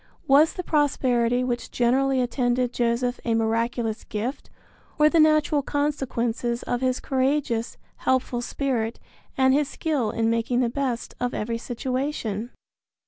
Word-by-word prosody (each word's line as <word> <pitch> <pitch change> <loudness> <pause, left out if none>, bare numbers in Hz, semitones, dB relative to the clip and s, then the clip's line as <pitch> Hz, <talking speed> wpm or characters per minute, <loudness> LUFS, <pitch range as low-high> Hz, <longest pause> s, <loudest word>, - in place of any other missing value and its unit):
Was 295 +4 +5
the 360 - -5
prosperity 255 -6 +1
which 245 -1 -2
generally 260 +2 +2
attended 245 0 0
Joseph 245 +1 0
a 230 -1 +1
miraculous 225 0 -1
gift 225 +6 -4 0.5
or 300 0 +5
the 335 - +4
natural 310 -1 +4
consequences 245 -5 -1
of 245 0 -2
his 255 -1 +1
courageous, 260 -3 0 0.2
helpful 255 -2 0
spirit 240 -3 -2 0.4
and 260 0 +4
his 290 0 +2
skill 285 -9 -1
in 225 +1 0
making 230 +2 +1
the 240 - +1
best 250 -2 -3
of 245 0 -2
every 230 +2 -2
situation? 245 -3 -3
250 Hz, 135 wpm, -25 LUFS, 235-275 Hz, 0.5 s, Was